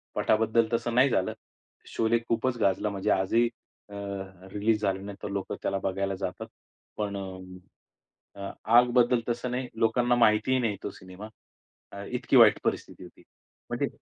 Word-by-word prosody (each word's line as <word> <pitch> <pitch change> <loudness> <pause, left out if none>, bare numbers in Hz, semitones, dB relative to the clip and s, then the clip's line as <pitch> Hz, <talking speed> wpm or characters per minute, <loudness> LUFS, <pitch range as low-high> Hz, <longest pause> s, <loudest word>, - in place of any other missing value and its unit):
पटाबद्दल 110 +1 +2
तसं 115 0 -1
नाही 130 +3 +5
झालं. 95 -6 0 0.5
शोले 115 +1 +1
खूपच 120 +1 0
गाजला 100 +1 +2
म्हणजे 100 +1 -1
आजही 100 +6 +2 0.4
अ, - - -13 0.6
रिलीज 105 +1 +1
झाल्यानंतर 100 0 -3
लोकं 100 -1 -3
त्याला 100 - 0
बघायला 95 0 -1
जातात. 95 - -5 0.5
पण 100 -1 -2 1.2
अ, 100 0 -5 0.2
आग 120 +2 +6
बद्दल 125 0 +4
तसं 120 +1 -2
नाही, 125 +1 -2
लोकांना 120 +2 +2
माहितीही 115 +2 +3
नाही 110 -5 -1
तो - - -3
सिनेमा. 95 +3 -11 0.8
इतकी 125 +2 -1
अ, - - +9
वाईट 110 -3 +7
परिस्थिती - - -3
होती. - - -15 0.5
म्हणजे - - -1
110 Hz, 140 wpm, -27 LUFS, 100-120 Hz, 1.2 s, अ